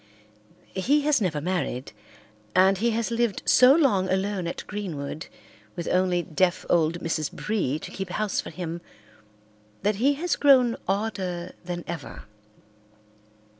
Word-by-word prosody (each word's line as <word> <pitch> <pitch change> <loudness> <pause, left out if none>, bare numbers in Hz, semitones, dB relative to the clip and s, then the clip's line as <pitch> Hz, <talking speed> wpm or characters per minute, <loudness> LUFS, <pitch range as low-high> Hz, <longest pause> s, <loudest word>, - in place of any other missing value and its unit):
He 275 +11 +2
has 290 -4 +2
never 165 -7 0
married, 160 -6 -2 0.6
and 190 +1 +5
he 235 +3 +2
has 230 +1 -1
lived 235 -3 0
so 255 +2 +7
long 205 - +2
alone 190 -1 -1
at 170 - -5
Greenwood 170 -6 -5 0.5
with 170 -2 -5
only 180 -1 +2
deaf 185 +2 0
old 170 0 +2
Mrs. 155 -3 -2
Bree 195 -10 -1
to - - -9
keep 190 -1 -5
house 210 +3 -1
for - - -8
him 170 -1 -5 1.0
that 205 0 +1
he 275 +6 +3
has 340 +4 -1
grown 255 -5 +5
odder 190 -3 -2
than 175 -1 -5
ever. 170 -4 -7
190 Hz, 135 wpm, -26 LUFS, 175-225 Hz, 1.0 s, so